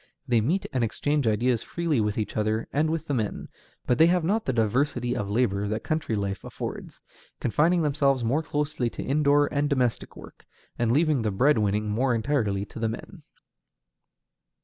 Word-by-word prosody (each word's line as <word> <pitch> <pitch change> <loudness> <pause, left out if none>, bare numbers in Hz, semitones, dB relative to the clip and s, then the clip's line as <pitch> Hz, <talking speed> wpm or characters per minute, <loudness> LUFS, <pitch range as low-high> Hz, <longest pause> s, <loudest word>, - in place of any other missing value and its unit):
They 120 -2 +3
meet 165 - 0
and 130 -2 +1
exchange 145 +4 0
ideas 115 +2 +1
freely 165 -8 -1
with 105 0 -1
each 110 - -3
other 110 +1 0
and 155 +2 +2
with 160 0 -2
the 145 - -2
men, 110 -5 -3 0.4
but 125 - +1
they 160 - +7
have 175 0 +2
not 210 +7 0
the - - +1
diversity 120 +2 0
of 105 -5 -3
labor 105 -3 +1
that 110 +2 -3
country 155 -7 -1
life 100 -3 -3
affords, - - -7 0.4
confining 165 +7 +2
themselves 140 -3 +1
more 130 +7 +1
closely 150 -5 -2
to - - -7
indoor 145 +1 +3
and 145 0 +1
domestic 125 -5 -1
work, - - -14 0.3
and 120 -1 0
leaving 150 -1 +2
the 110 - 0
bread 125 +6 +3
winning 105 +1 0
more 125 +3 +1
entirely 110 -5 0
to 110 - -10
the 115 0 0
men. 110 - -8
125 Hz, 180 wpm, -26 LUFS, 110-150 Hz, 0.4 s, they